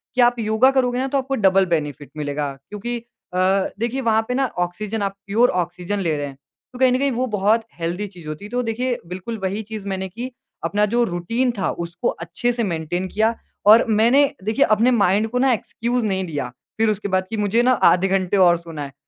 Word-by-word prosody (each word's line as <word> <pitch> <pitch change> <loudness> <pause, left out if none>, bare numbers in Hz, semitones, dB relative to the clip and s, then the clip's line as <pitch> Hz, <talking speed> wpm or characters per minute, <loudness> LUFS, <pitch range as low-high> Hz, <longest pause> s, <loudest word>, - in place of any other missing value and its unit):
कि 250 - +4
आप 240 0 +4
योगा 220 +4 +3
करोगे 250 -2 +1
ना 265 - 0
तो 275 - 0
आपको 270 0 -1
डबल 195 -4 +4
बेनिफिट 150 -4 -2
मिलेगा, 145 -1 -2 0.2
क्योंकि 235 +4 -4 0.4
अ, 180 - 0 0.4
देखिए 240 +4 -1
वहाँ 225 -3 +3
पे 250 - -1
ना 270 +1 +1 0.2
ऑक्सीजन 210 +4 -5
आप 195 -1 -2
प्योर 230 +5 +4
ऑक्सीजन 180 +4 -5
ले 165 -5 0
रहे 145 0 -3
हैं। 135 -1 -11 0.4
तो 250 - -10
कहीं 260 -1 +5
न 250 - +3
कहीं 280 -1 +1
वो 250 +2 0
बहुत 215 +2 +2 0.2
हेल्दी 175 +5 -2
चीज़ 175 -5 -13
होती 155 +6 -6
है। 210 - -9
तो 245 0 0
देखिए, 245 +2 -1
बिल्कुल 185 +6 -5
वही 200 +3 -1
चीज़ 215 -1 -7
मैंने 190 -1 -3
की। 240 +7 -6 0.3
अपना 210 +1 +2
जो 240 0 +4
रूटीन 230 +7 0
था, 195 - 0
उसको 170 +1 -4
अच्छे 175 +9 -2
से 240 -1 -2
मेंटेन 175 0 -2
किया। 220 +4 +1 0.3
और 220 +3 +8
मैंने, 235 +6 +5 0.2
देखिए 225 +7 +2
अपने 220 +4 +3
माइंड 205 -1 +3
को 250 +2 -1
ना 265 0 +4
एक्सक्यूज़ 235 +1 -2
नहीं 190 -2 -1
दिया 145 -7 -4 0.3
फिर 225 0 +3
उसके 210 -1 -2
बाद 185 0 0
कि, 225 - -3
"मुझे 210 +3 +2
ना 255 - +4 0.2
आधे 180 +2 +3
घंटे 190 0 +1
और 175 -2 +5
सोना 165 -3 -7
है।" 135 -1 -8
210 Hz, 220 wpm, -21 LUFS, 180-240 Hz, 0.4 s, और